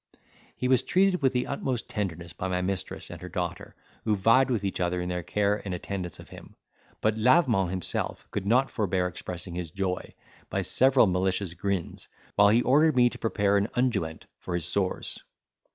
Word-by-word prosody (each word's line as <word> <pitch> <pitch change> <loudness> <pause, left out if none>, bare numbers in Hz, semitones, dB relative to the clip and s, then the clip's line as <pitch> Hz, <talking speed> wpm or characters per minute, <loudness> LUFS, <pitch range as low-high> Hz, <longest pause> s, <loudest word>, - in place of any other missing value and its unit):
He 125 - -1
was 130 -2 +4
treated 190 -1 +2
with 135 -2 +3
the 125 -1 0
utmost 130 -3 -3
tenderness 85 -6 -4
by 95 - -4
my 90 0 -1
mistress 95 0 -4
and - - -9
her 90 - -7
daughter, 90 -1 -4 0.3
who 110 -2 +2
vied 115 +7 +4
with 115 -5 0
each 95 - -2
other 90 0 0
in 90 0 -3
their 90 0 -2
care 105 +3 0
and 95 -3 -3
attendance 90 -2 -5
of - - -13
him; - - -13 0.5
but 110 0 +1
Lavement 120 - +4
himself 95 -1 -3
could 100 -1 -3
not 130 +5 +3
forbear 95 -4 0
expressing 90 0 -6
his 85 -2 -4
joy, 95 +1 -3 0.3
by - - -1
several 130 -1 +5
malicious 95 -1 0
grins, 95 0 -3 0.3
while 100 0 +6
he 115 +3 +4
ordered 150 +4 +4
me 120 -1 +5
to - - -10
prepare 100 -2 +2
an 100 +1 +1
unguent 100 -11 -1
for 90 - -4
his 85 -2 -1
sores. 95 +1 -2
100 Hz, 185 wpm, -27 LUFS, 90-120 Hz, 0.5 s, while